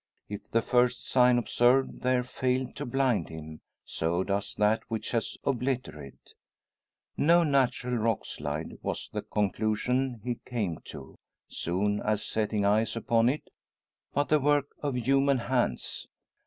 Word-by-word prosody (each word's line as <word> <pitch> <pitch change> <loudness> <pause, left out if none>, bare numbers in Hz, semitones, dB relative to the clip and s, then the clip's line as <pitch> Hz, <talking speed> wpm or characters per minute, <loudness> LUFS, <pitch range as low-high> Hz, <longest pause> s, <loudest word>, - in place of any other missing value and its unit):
If 105 0 -8
the 115 0 +1
first 125 -1 +2
"sign" 125 -1 +5
observed 120 +2 +2
there 125 0 +2
failed 130 0 -1
to - - -4
blind 130 -8 +1
him, 80 -1 -9 0.2
so 85 +3 -1
does 100 +1 -2
that 105 +2 +2
which 110 -1 -4
has 115 -2 -1
obliterated 125 - -2
it. - - -19 0.8
No 170 +3 +5
natural 130 -4 +1
rock 115 -1 0
slide, 75 +2 -5
was - - -4
the - - -2
conclusion 110 +5 0
he 120 -1 -3
came 105 -10 -3
to, - - -10 0.3
soon 105 +4 -1
as 105 -1 0
setting 105 -1 0
eyes 110 +3 +2
upon 115 +1 +2
it; 145 +4 -4 0.6
but 145 - 0
the 150 - +4
work 145 0 +2
of 145 -3 -2
human 135 +3 +3
hands! 120 - -1
120 Hz, 140 wpm, -29 LUFS, 105-130 Hz, 0.8 s, sign